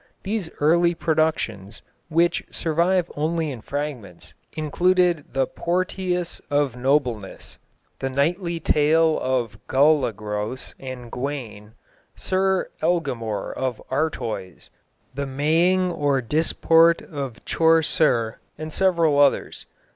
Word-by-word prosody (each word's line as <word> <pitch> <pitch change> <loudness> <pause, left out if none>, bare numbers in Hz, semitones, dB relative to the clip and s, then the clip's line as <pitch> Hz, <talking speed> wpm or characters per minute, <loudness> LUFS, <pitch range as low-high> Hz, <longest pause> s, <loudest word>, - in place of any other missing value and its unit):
These 200 -4 -2
early 170 +3 +3
productions, 155 - -1 0.3
which 170 +2 +2
survive 175 +2 0
only 160 +1 -1
in 125 -4 -7
fragments, 135 - -6 0.2
included 175 +1 +2
The 135 0 +2
Porteous 180 +2 -2
of 145 -4 +1
Noblenes, 125 -6 -1 0.4
The 135 - -2
Knightly 170 +6 0
Tale 160 +1 +3
of 120 -5 -1
Golagros 125 -5 +1
and 130 -3 -8
Gawane, 120 -6 -5 0.4
Sir 190 0 0
Eglamoure 135 -11 -1
of 130 -3 -3
Artoys, 115 - -3 0.4
The 140 +1 -3
Maying 165 +7 +2
or 145 -4 +1
Disport 165 +5 +3
of 135 -6 -7
Chaucer, 155 -8 +2 0.2
and 155 0 -6
several 170 -6 +2
others. 140 -1 +2
150 Hz, 100 wpm, -23 LUFS, 130-170 Hz, 0.4 s, early